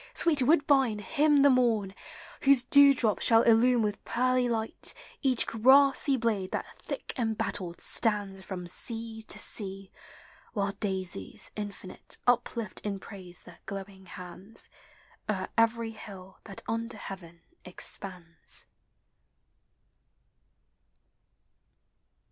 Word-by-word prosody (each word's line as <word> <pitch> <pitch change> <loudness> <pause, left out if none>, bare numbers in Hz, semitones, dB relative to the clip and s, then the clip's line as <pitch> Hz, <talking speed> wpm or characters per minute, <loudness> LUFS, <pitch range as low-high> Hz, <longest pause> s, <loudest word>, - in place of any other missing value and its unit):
sweet 310 -5 +3
woodbine, 275 -5 +3
hymn 290 +5 +3
the 285 - +7
morn, 225 -6 +2 0.5
Whose 275 -2 +5
dewdrops 275 -5 +5
shall 225 0 +5
illume 235 +1 +4
with 210 -1 -3
pearly 255 0 +1
light 225 -1 -2 0.3
Each 260 -4 +3
grassy 270 +4 +4
blade 215 -6 -1
that - - -2
thick - - -6
embattled 210 -6 -2
stands 205 -4 0
From 185 -2 -6
sea 225 +5 -4
to 220 - -3
sea, 195 -2 -2 0.6
while 200 -2 0
daisies 190 - -4
infinite 205 -3 -8
Uplift 235 -4 0
in 205 -2 -3
praise 185 -2 -11
their - - -15
glowing 195 -1 -8
hands, 180 +4 -10 0.6
O'er 190 -3 -1
every 230 0 +2
hill 190 -4 -11
that 195 - -9
under 230 0 -3
heaven 175 -4 -9 0.2
expands. 175 -5 -6
220 Hz, 105 wpm, -29 LUFS, 195-245 Hz, 0.6 s, the